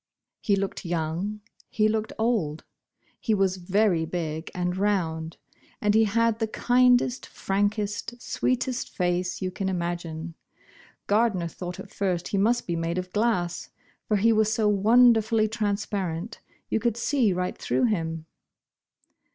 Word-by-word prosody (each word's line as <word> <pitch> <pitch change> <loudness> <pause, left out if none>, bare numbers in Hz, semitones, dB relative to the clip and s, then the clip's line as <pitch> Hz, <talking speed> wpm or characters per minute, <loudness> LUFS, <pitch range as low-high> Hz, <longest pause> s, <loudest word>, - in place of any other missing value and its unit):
He 200 - +2
looked 195 0 -3
young, 175 +5 -2 0.3
he 215 -1 +2
looked 220 0 -1
old. 215 -10 0 0.6
He 220 - +1
was 190 -1 +1
very 185 -1 +2
big 160 -1 -4
and 180 0 -1
round, 170 -5 -1 0.4
and 210 -1 +2
he 220 +1 +5
had 230 +1 +1
the 225 - 0
kindest, 245 +2 +3
frankest, 205 +4 -2
sweetest 255 +1 -1
face 180 +1 -1
you 185 - -1
can 190 +1 -2
imagine. 170 -2 -3 0.7
Gardner 205 -5 +2
thought 175 +2 -7
at 195 - -9
first 180 -3 -1
he 200 - -1
must 235 +4 +2
be 170 - -2
made 165 +1 -2
of 180 0 -4
glass, 205 -6 0 0.4
for 210 - +2
he 225 +3 +4
was 215 0 +2
so 220 -1 +1
wonder 225 +3 +5
fully 220 0 +1
transparent 205 -3 -2 0.2
— - - -38
you - - +2
could 235 0 0
see 240 -3 +2
right 180 0 -2
through - - -1
him. 165 -8 -1
200 Hz, 145 wpm, -26 LUFS, 175-220 Hz, 0.7 s, he